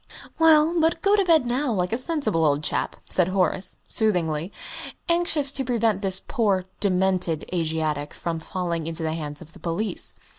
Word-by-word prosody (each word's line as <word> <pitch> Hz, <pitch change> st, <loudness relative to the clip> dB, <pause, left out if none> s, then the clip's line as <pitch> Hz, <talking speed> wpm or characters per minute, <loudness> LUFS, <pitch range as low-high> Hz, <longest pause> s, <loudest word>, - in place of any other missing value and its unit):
"Well, 320 Hz, 0 st, +6 dB
but 325 Hz, +1 st, +1 dB
go 400 Hz, +1 st, +5 dB
to 405 Hz, -, +3 dB
bed 325 Hz, -7 st, +4 dB
now, 250 Hz, +3 st, 0 dB
like 180 Hz, -1 st, -1 dB
a -, -, +1 dB
sensible 275 Hz, -, 0 dB
old 145 Hz, -1 st, +2 dB
chap," -, -, -1 dB
said 180 Hz, -2 st, +3 dB
Horace, 185 Hz, 0 st, -1 dB
soothingly, 175 Hz, -5 st, 0 dB, 0.6 s
anxious 335 Hz, -5 st, +2 dB
to 275 Hz, -, -2 dB
prevent 230 Hz, -5 st, +1 dB
this 190 Hz, -2 st, +3 dB
poor 200 Hz, -8 st, 0 dB
demented 185 Hz, -4 st, 0 dB
Asiatic 155 Hz, -3 st, -1 dB
from 165 Hz, -1 st, -3 dB
falling 170 Hz, -1 st, -3 dB
into 165 Hz, 0 st, -4 dB
the 160 Hz, 0 st, -1 dB
hands 150 Hz, -1 st, -6 dB
of 160 Hz, 0 st, -16 dB
the -, -, -14 dB
police. 180 Hz, +6 st, -2 dB
185 Hz, 170 wpm, -24 LUFS, 165-255 Hz, 0.6 s, Well